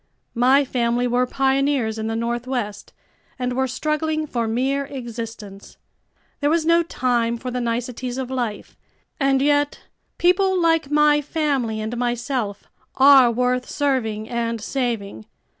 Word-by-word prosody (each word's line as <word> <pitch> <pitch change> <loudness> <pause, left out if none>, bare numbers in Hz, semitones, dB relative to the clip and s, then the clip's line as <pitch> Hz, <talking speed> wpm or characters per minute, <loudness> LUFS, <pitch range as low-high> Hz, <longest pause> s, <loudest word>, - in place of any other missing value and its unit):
My 260 +4 +4
family 240 -1 0
were 245 +1 +1
pioneers 270 -4 +1
in 220 - -3
the 225 - -2
Northwest 235 -2 -3 0.5
and 250 -1 -2
were 265 +1 0
struggling 310 +4 -1
for 235 -6 -2
mere 265 +5 0
existence. 230 -6 -8 0.6
There 290 - +1
was 325 0 +1
no 335 +1 +4
time 240 -7 0
for 250 +1 -6
the 250 0 -2
niceties 245 +1 -3
of 260 -1 -4
life. 240 -5 -4 0.4
And 270 -1 +2
yet, 290 0 +1 0.4
people 370 +1 +3
like 325 -4 +2
my 295 0 +4
family 280 -7 -1
and 220 +2 -4
myself 240 -3 -2 0.3
are 270 -2 +7
worth 250 +1 0
serving 225 -7 -1
and 230 -1 -2
saving. 220 - -3
250 Hz, 135 wpm, -22 LUFS, 235-280 Hz, 0.6 s, are